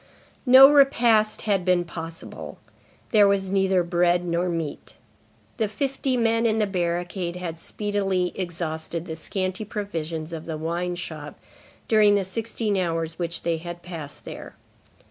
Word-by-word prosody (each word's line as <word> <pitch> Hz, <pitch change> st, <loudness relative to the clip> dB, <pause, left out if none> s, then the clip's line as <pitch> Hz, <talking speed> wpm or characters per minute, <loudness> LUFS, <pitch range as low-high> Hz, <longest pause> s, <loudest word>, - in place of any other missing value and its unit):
No 260 Hz, +2 st, +10 dB
repast 240 Hz, -7 st, +4 dB
had 200 Hz, -4 st, +1 dB
been 180 Hz, -1 st, +2 dB
possible. 165 Hz, -1 st, -8 dB, 0.5 s
There 210 Hz, -3 st, +6 dB
was 195 Hz, -1 st, +1 dB
neither 190 Hz, -2 st, +2 dB
bread 175 Hz, 0 st, +2 dB
nor 175 Hz, +1 st, 0 dB
meat. 165 Hz, -4 st, -5 dB, 0.6 s
The 220 Hz, -3 st, +1 dB
fifty 265 Hz, +4 st, -1 dB
men 230 Hz, 0 st, +2 dB
in 220 Hz, 0 st, +1 dB
the 215 Hz, -, +2 dB
barricade 175 Hz, -1 st, -2 dB
had 170 Hz, -2 st, -5 dB
speedily 195 Hz, -3 st, -1 dB
exhausted 170 Hz, -2 st, -4 dB
the 160 Hz, -2 st, -5 dB
scanty 185 Hz, +4 st, -3 dB
provisions 170 Hz, -7 st, -5 dB
of 160 Hz, -1 st, -6 dB
the 160 Hz, -2 st, -3 dB
wine 170 Hz, +3 st, -2 dB
shop 155 Hz, -4 st, -7 dB, 0.5 s
during 210 Hz, -2 st, +5 dB
the 200 Hz, -, +1 dB
sixteen 215 Hz, +1 st, -1 dB
hours 165 Hz, -2 st, -2 dB
which 170 Hz, -1 st, -3 dB
they 170 Hz, -1 st, 0 dB
had 175 Hz, +1 st, -8 dB
passed 165 Hz, -5 st, -8 dB
there. -, -, -9 dB
180 Hz, 145 wpm, -24 LUFS, 170-210 Hz, 0.6 s, No